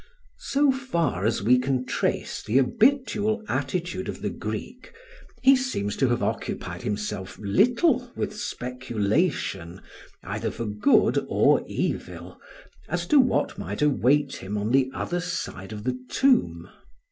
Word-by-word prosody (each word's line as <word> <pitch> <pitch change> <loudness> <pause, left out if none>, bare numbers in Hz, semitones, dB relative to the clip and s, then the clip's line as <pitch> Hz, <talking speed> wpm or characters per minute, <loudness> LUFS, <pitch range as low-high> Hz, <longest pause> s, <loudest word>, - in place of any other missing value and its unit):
So 280 0 +2
far 170 - -1
as 110 -3 -1
we 125 +4 +5
can 130 0 -1
trace - - -2
the 115 - 0
habitual 220 - +2
attitude 185 0 -2
of - - -7
the - - -1
Greek - - -6 0.5
he 270 +1 +8
seems 250 - -2
to 135 - +2
have 120 0 0
occupied - - -3
himself 105 -2 -4
little 245 - +2
with 210 - -3
speculation, 120 - -2 0.4
either 105 +4 -3
for 115 - -5
good 105 0 +3
or - - +4
evil, - - -4 0.5
as 175 -1 -1
to 295 - +6
what 255 -2 +1
might - - -3
await 145 0 +2
him 100 +3 -5
on 105 +2 -1
the 130 0 +3
other 175 +5 -3
side 115 - -5
of 105 -1 -7
the 125 +1 -2
tomb. 270 -2 +2
135 Hz, 135 wpm, -25 LUFS, -, 0.5 s, he